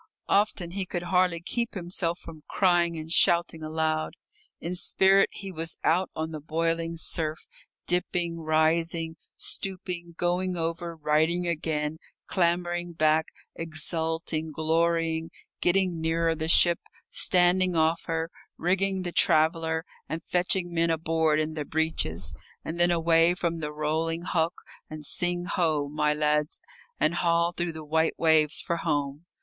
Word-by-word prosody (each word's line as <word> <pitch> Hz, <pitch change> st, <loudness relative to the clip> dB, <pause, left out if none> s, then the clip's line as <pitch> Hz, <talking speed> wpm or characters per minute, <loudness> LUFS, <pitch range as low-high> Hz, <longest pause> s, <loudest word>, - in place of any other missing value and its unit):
Often 200 Hz, -4 st, +1 dB
he 190 Hz, 0 st, -3 dB
could 175 Hz, -1 st, -3 dB
hardly 180 Hz, -1 st, +2 dB
keep 235 Hz, +6 st, -2 dB
himself 175 Hz, -2 st, -1 dB
from 160 Hz, -4 st, -11 dB
crying 175 Hz, -3 st, +2 dB
and 160 Hz, +1 st, -7 dB
shouting 170 Hz, -1 st, +3 dB
aloud. 155 Hz, 0 st, -1 dB, 0.4 s
In 170 Hz, -, -4 dB
spirit 195 Hz, +2 st, +3 dB
he 195 Hz, -1 st, -7 dB
was 165 Hz, -1 st, -3 dB
out 180 Hz, +3 st, +2 dB
on 160 Hz, +1 st, -3 dB
the 155 Hz, -2 st, -6 dB
boiling 165 Hz, +2 st, -1 dB
surf, 160 Hz, -1 st, -3 dB, 0.4 s
dipping, 175 Hz, -1 st, 0 dB
rising, 160 Hz, +1 st, +1 dB, 0.2 s
stooping, 180 Hz, -3 st, -2 dB
going 180 Hz, +1 st, 0 dB
over, 165 Hz, +1 st, -3 dB
righting 160 Hz, +3 st, +1 dB
again, 155 Hz, -2 st, -1 dB, 0.3 s
clambering 175 Hz, -1 st, 0 dB
back, 155 Hz, 0 st, +2 dB, 0.3 s
exulting, 160 Hz, 0 st, -3 dB
glorying, 165 Hz, +1 st, +1 dB, 0.3 s
getting 180 Hz, -2 st, +2 dB
nearer 165 Hz, 0 st, +1 dB
the 160 Hz, 0 st, -3 dB
ship, 170 Hz, +1 st, +5 dB, 0.3 s
standing 180 Hz, 0 st, +3 dB
off 160 Hz, +1 st, +2 dB
her, 165 Hz, 0 st, -2 dB, 0.3 s
rigging 190 Hz, +2 st, +1 dB
the 175 Hz, -, -3 dB
"traveller," 160 Hz, 0 st, +2 dB, 0.2 s
and 165 Hz, +1 st, -4 dB
fetching 180 Hz, 0 st, +1 dB
men 165 Hz, 0 st, +2 dB
aboard 160 Hz, -1 st, +1 dB
in 155 Hz, 0 st, -1 dB
the 155 Hz, -1 st, -3 dB
"breeches." 160 Hz, -, -2 dB, 0.3 s
And 165 Hz, +2 st, -5 dB
then 175 Hz, 0 st, +5 dB
away 165 Hz, 0 st, +4 dB
from 170 Hz, -2 st, -2 dB
the 150 Hz, -1 st, -4 dB
rolling 160 Hz, +2 st, -1 dB
hulk, 170 Hz, -1 st, -1 dB, 0.3 s
and 155 Hz, -1 st, -7 dB
sing 175 Hz, +3 st, -1 dB
ho, 160 Hz, -6 st, 0 dB
my 150 Hz, +1 st, +1 dB
lads, 150 Hz, 0 st, 0 dB, 0.4 s
and 155 Hz, +2 st, +2 dB
haul 170 Hz, 0 st, +2 dB
through 175 Hz, -1 st, -3 dB
the 160 Hz, -1 st, -8 dB
white 160 Hz, +2 st, +1 dB
waves 160 Hz, -2 st, +3 dB
for 170 Hz, -, -2 dB
home. 145 Hz, 0 st, -2 dB
165 Hz, 140 wpm, -27 LUFS, 160-175 Hz, 0.4 s, ship